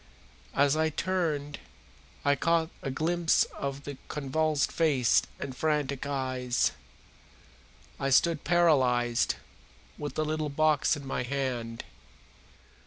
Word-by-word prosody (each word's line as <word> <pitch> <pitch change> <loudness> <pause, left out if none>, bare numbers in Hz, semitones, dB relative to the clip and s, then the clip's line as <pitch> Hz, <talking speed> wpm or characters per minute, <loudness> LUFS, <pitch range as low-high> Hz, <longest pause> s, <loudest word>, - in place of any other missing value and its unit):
As 140 +1 +4
I 160 0 +2
turned 155 -4 -2 0.7
I 145 0 +4
caught 165 +2 +1
a - - -3
glimpse 165 +5 +2
of 140 0 -5
a 140 -2 -5
convulsed 150 +1 0
face 140 -8 +3 0.2
and 135 -2 -5
frantic 145 -2 -1
eyes. 130 -3 0 1.3
I 135 - 0
stood 160 +3 +3
paralyzed, 130 -9 +3 0.6
with 145 -1 -5
the 155 - 0
little 155 0 -1
box 155 +1 +2
in 140 - -9
my 135 -1 -2
hand. 125 -3 -3
145 Hz, 110 wpm, -29 LUFS, 130-155 Hz, 1.3 s, As